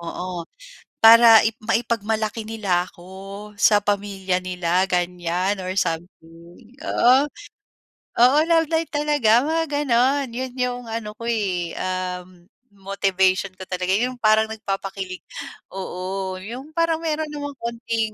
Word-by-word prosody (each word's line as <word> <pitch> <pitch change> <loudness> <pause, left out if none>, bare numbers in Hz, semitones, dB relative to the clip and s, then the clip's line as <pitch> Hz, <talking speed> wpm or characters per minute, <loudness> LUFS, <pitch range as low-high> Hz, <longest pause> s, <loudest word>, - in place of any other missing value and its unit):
Oo. 170 0 -6 0.6
Para 230 0 +9
i 220 - +2
maipagmalaki 220 -1 -1
nila 190 -5 0
ako, 195 +4 -11
sa 205 -1 +5
pamilya 195 -2 -1
nila 180 0 0
ganyan 180 +2 -1
or 185 0 -4
something, 170 +3 -5 0.2
oo. 260 +4 +4 0.9
Oo, 255 +4 +6
love 330 -1 +4
life 325 0 0
talaga, 290 -6 +3
mga 325 +1 0 0.2
gano'n 260 +3 +2
'Yon 255 0 -4
'yung 245 0 -2
ano 220 -2 -5
ko, 230 - -8
eh, 185 -7 -1
ah, 185 -1 -3 0.5
motivation 195 -1 0
ko 190 - -8
talaga, 180 0 -2
'yong 250 +2 -1
parang 215 0 +4
nagpapakilig 195 -3 -5 0.5
oo. 190 0 -4
'Yong 240 +10 -8
parang 330 -1 +1
meron 315 -1 -1
namang 285 -1 -5
konting, 230 -2 -3
205 Hz, 120 wpm, -22 LUFS, 185-235 Hz, 0.9 s, Para